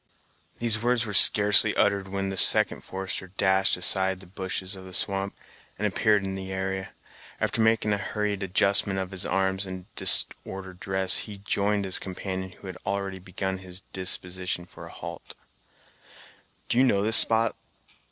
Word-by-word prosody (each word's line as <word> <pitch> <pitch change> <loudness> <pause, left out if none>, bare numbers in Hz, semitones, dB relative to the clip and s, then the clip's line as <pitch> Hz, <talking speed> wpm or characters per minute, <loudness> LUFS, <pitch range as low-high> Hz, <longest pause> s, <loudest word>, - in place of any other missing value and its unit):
These 115 -2 -1
words 120 0 0
were 105 - -6
scarcely 105 +1 +7
uttered 100 -1 +1
when 95 0 -3
the - - -5
second - - +6
forester 95 0 -6
dashed 95 0 +1
aside 95 +1 +1
the 95 - -13
bushes 95 +1 -5
of 95 - -11
the 95 -1 -4
swamp, 100 0 -1 0.4
and 105 - -2
appeared 105 0 +1
in 95 0 -4
the 95 0 -6
area. 95 0 -4 0.5
After 115 - -1
making 110 -1 +2
a 100 - -1
hurried 105 0 -3
adjustment 95 +1 +2
of 95 0 -4
his 95 -2 -3
arms 95 +1 -1
and 95 -2 -7
disordered 95 -1 -1
dress, 95 -1 +2
he 105 -2 -7
joined 100 0 -1
his 95 - +1
companion, 95 0 -5
who - - -17
had 95 - -8
already 100 -1 -4
begun 95 +1 -5
his 95 0 -10
disposition 90 -1 -3
for - - -13
a - - -12
halt. - - -9 1.3
"Do 120 - +1
you - - +6
know 100 -6 +2
this 110 +1 +4
spot!" 115 0 +3
95 Hz, 165 wpm, -26 LUFS, 95-100 Hz, 1.3 s, scarcely